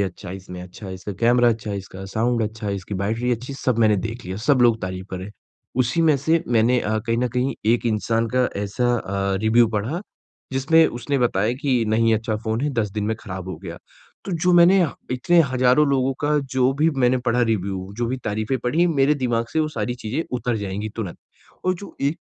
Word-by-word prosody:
"ये - - +4
अच्छा 95 0 -5
है, 95 - -5
इसमें 90 -1 -9
अच्छा, 90 +3 -10
इसका 95 +2 -6
कैमरा 120 +1 +4
अच्छा 110 -2 -2
है, 100 - -2
इसका 95 0 -9
साउंड 115 +1 +1
अच्छा 110 0 -4
है, 100 - -1
इसकी 95 +1 -6
बैटरी 115 +5 0
अच्छी 125 +3 -4
है।" 135 - -7
सब 125 -3 +1
मैंने 110 -2 +4
देख 115 +2 -7
लिया, 95 +1 -5
सब 140 -3 +4
लोग 115 -2 +4
तारीफ़ 95 0 -5
कर 95 - -4
रहें। 95 +3 -7 0.5
उसी 130 +7 0
में 155 -3 +4
से 160 +5 +1
मैंने 120 +1 +3
अ, 110 +1 -1
कहीं 115 0 +1
न 125 - +1
कहीं 125 +1 0 0.2
एक 120 - -2
इंसान 115 +1 0
का 125 -1 +3
ऐसा 120 +5 0
अ, 100 -2 -2
रिव्यू 115 +2 +5
पढ़ा, 125 - -2 0.5
जिसमें 160 +5 +4
उसने 130 +4 -2
बताया 115 -2 +1
कि, 130 -5 +1
"नहीं 115 +1 +3
अच्छा 110 0 -1
फ़ोन 110 +1 -1
है, 145 +2 0
10 110 -5 -1
दिन 105 -1 -2
में 110 +1 0
ख़राब 95 -2 -7
हो 95 - -5
गया।" 85 -2 -8 0.5
तो 195 - -4
जो 180 +2 +2
मैंने 175 +2 +6
ह 160 - +1 0.2
इतने 145 +7 +3
हज़ारों 130 +3 +4
लोगों 135 -1 +2
का 150 0 +2
जो 130 0 +3
भी 160 - +4
मैंने 125 +1 +3
पढ़ा 120 +1 +2
रिव्यू, 95 -4 -1
जो 120 - 0
भी 130 - -2
तारीफ़ें 110 +5 -1
पढ़ीं, 160 +8 +2
मेरे 145 -2 +3
दिमाग़ 120 -4 0
से 160 - +2
वो 155 - 0
सारी 125 -5 -3
चीज़ें 125 +5 -3 0.2
उतर 120 0 -1
जाएँगी 105 +1 -4
तुरंत। 100 -7 -4 0.5
और 185 0 +2
जो 200 +3 -10
एक 145 +5 0
120 Hz, 225 wpm, -22 LUFS, 105-130 Hz, 0.5 s, मैंने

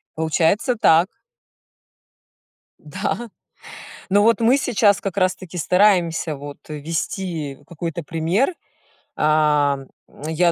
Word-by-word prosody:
Получается 160 - +1
так. 175 -5 +4 1.7
Да. 240 -1 -4 0.8
Но 205 +2 +4
вот 230 -2 +4
мы 245 +5 +4
сейчас 210 -6 +2
как 195 -1 -4
раз-таки 185 -1 -1
стараемся 175 -3 +2
вот 145 +1 -9
вести 160 -1 -4
какой-то 170 0 -5
пример. 170 - 0 0.6
Ам, 150 -3 +2 0.4
я 170 +2 +2
170 Hz, 90 wpm, -21 LUFS, 155-200 Hz, 1.7 s, так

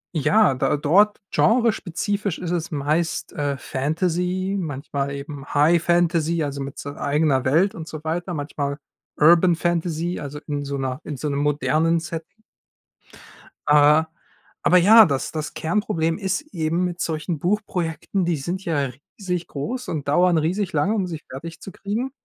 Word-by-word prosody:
ja, 180 +2 +4
da 130 +1 0
d 145 - -7
dort 205 +8 +4
genrespezifisch 205 -4 +1
ist 175 -1 -4
es 170 -2 -2
meist, 155 +3 -1
äh, 145 -1 -2
Fantasy, 180 +8 -1
manchmal 140 -3 -3
eben 140 0 -7
High 155 +4 +4
Fantasy, 170 -1 +2
also, 140 -1 -4
mit 135 0 -6
so 145 - -6
eigener 145 -2 +1
Welt 165 +9 +3
und 160 0 -7
so 155 -1 -8
weiter, 175 +3 -3
manchmal 145 -1 -3 0.4
Urban 170 +3 +6
Fantasy, 170 0 -1
also 145 0 -6
in 145 -1 -2
so 140 0 -3
'ner 130 -1 -3
in 145 - -6
so 150 - -3
'nem 140 0 -1
modernen 155 +3 +1
Setting. 165 +6 -8 1.3
Ah, 150 +2 +6 0.6
aber 180 - +5
ja, 215 +5 +8
das 140 -5 -2
das 155 0 -4
Kernproblem 165 -2 -1
ist 195 -2 -1
eben 165 +1 0
mit 175 0 -4
solchen 160 +1 -2
Buchprojekten, 180 0 -1
die 170 -2 0
sind 175 +7 -4
ja 145 -5 0 0.3
riesig 180 -4 -3
groß 245 - -5
und 150 -4 -4
dauern 175 +4 +4
riesig 180 +5 0
lange, 195 +2 +1
um 200 -4 0
sie 165 -4 -5
fertig 165 +5 -8
zu 195 - -10
kriegen. 220 +6 -3
165 Hz, 160 wpm, -23 LUFS, 145-180 Hz, 1.3 s, ja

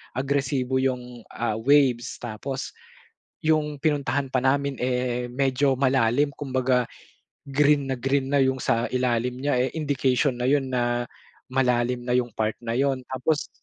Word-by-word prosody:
agresibo 135 -1 -1
yung, 125 -3 -3
ah, 115 -2 -2
waves. 130 -2 +3
Tapos 125 +4 -5 0.8
yung 150 -2 +1
pinuntahan 140 -2 0
pa 130 -1 -1
namin 140 +1 +1
eh 125 -1 -1
medyo 135 +1 +1
malalim 135 +1 +2
kumbaga 130 -3 0 0.7
green 140 0 +3
na 130 - -1
green 135 +1 0
na 140 - +4
yung 130 0 +2
sa 115 +1 +1
ilalim 125 -1 0
niya 145 -2 +1
eh 130 - +2
indication 140 -3 +1
na 125 - 0
yun 135 -2 +1
na 120 -1 0 0.5
malalim 125 -1 +1
na 125 - 0
yung 125 -1 0
part 110 0 -1
na 115 - -2
yun. 135 -1 +1
Tapos 145 +4 0
130 Hz, 145 wpm, -25 LUFS, 125-140 Hz, 0.8 s, na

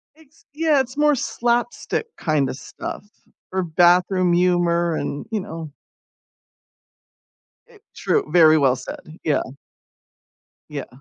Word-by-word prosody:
It's 315 0 -24
yeah, 310 -2 +2
it's 255 0 -3
more 295 0 +4
slapstick 240 - -1
kind 150 -5 0
of - - -4
stuff, - - -7 0.5
or 190 0 -1
bathroom 180 +2 +3
humor, 175 -1 +2
and, 145 -1 -4
you 220 - 0
know 165 -5 -8 2.0
I - - -19 0.2
true, - - 0
very 160 -2 +6
well 135 -4 +3
said. 125 - -8 0.2
Yeah. 150 - +1 1.3
Yeah. 145 -3 -6
175 Hz, 115 wpm, -21 LUFS, 155-240 Hz, 2.0 s, very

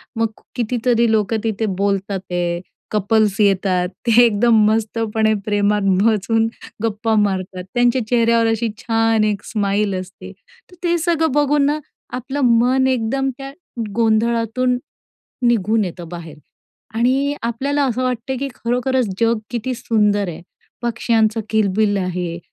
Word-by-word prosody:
मग 225 0 +1 0.3
कितीतरी 235 -1 +1
लोकं 220 0 +1
तिथे 220 -1 -1 0.2
बोलतात 200 -1 0
आहे, 175 -1 -1 0.3
कपल्स 210 0 +1
येतात 190 +1 +1
एकदम, 230 -1 +5
मस्तपणे 220 0 0
प्रेमात 205 0 +1 0.2
बसून 225 +1 +2 0.4
गप्पा 225 0 0
मारतात, 185 -2 -3
त्यांच्या 245 0 +2
चेहऱ्यावर 230 -1 +3
अशी 225 +1 0
छान 225 -1 +1
एक 210 -1 -1
स्माईल 205 -1 0
असते, 185 0 -10 0.4
तर - - -15
ते 345 -1 +2
सगळं 325 -2 +1
बघून 290 0 +2
ना, 295 +2 +1 0.3
आपलं 255 +3 -4 0.2
मन 260 +2 +3
एकदम, 260 +2 0
त्या 275 0 -7 0.4
गोंधळातून 230 +2 +1 0.7
निघून 220 -1 +2
येतं 175 -1 -7
बाहेर 165 -3 -9 0.6
आणि 265 +5 +1
आपल्याला 275 +5 0
असं 255 -1 -1
वाटते, 255 +1 -2
की 275 +2 -3
खरोखरच 250 +1 0
जग 230 0 +3
किती 245 +2 -2
सुंदर 210 -4 +1
आहे. 170 0 -7 0.4
पक्ष्यांचं 230 -2 +1
किलबिल 210 -1 +2
आहे, 180 -2 -3
225 Hz, 125 wpm, -19 LUFS, 205-245 Hz, 0.7 s, एकदम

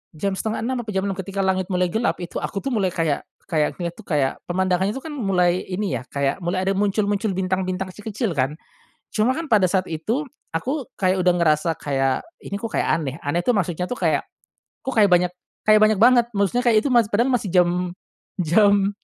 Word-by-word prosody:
jam 195 +5 -1
5.30 225 +5 -2
apa 230 - -6
jam 190 - +1
6.00 200 - -1
ketika 195 +1 -3
langit 190 -1 0
mulai 180 -2 0
gelap 225 +2 +1
itu, 170 - -5
aku 195 - -4
tuh 275 - -2
mulai 205 -5 +1
kayak 165 -5 -1 0.2
kayak 150 -2 +1
lihat 170 - -2
tuh 220 - -13
kayak 140 -4 0
pemandangan 185 +1 +1
itu 265 +6 -4
kan 320 - -6
mulai 185 -8 +1
ini 190 +1 -2
ya 130 - -13
kayak, 140 +6 -1
mulai 185 +2 -1
ada 195 - +1
muncul-muncul 200 0 0
bintang-bintang 185 0 -2
kecil-kecil 210 +1 -3
kan. 140 0 0 0.5
Cuma 225 +4 +1
kan 320 +2 -4
pada 210 -4 +4
saat 185 -1 +1
itu, 225 - -2 0.2
aku 265 - -2 0.2
kayak 185 0 +3
udah 180 - +5
ngerasa 165 -1 +2
kayak, 135 -2 0 0.2
ini 200 0 -5
kok 230 - -4
kayak - - +1
aneh. 145 -3 -1
Aneh 145 +5 0
tuh 240 +4 +1
maksudnya 180 -1 -1
tuh 250 - -3
kayak, - - +1 0.6
kok 265 - -3
kayak 205 - +7
banyak 180 0 +3 0.3
kayak 215 0 +6
banyak 215 -1 +4
banget, 240 -1 +6
maksudnya 200 +5 +1
kayak 220 -2 +5
itu 280 - -1
masih 235 -3 +4
padahal 240 +5 +3
masi 245 -5 0
jam 180 0 +2 0.5
jam 200 +4 +4
190 Hz, 200 wpm, -22 LUFS, 175-215 Hz, 0.6 s, kayak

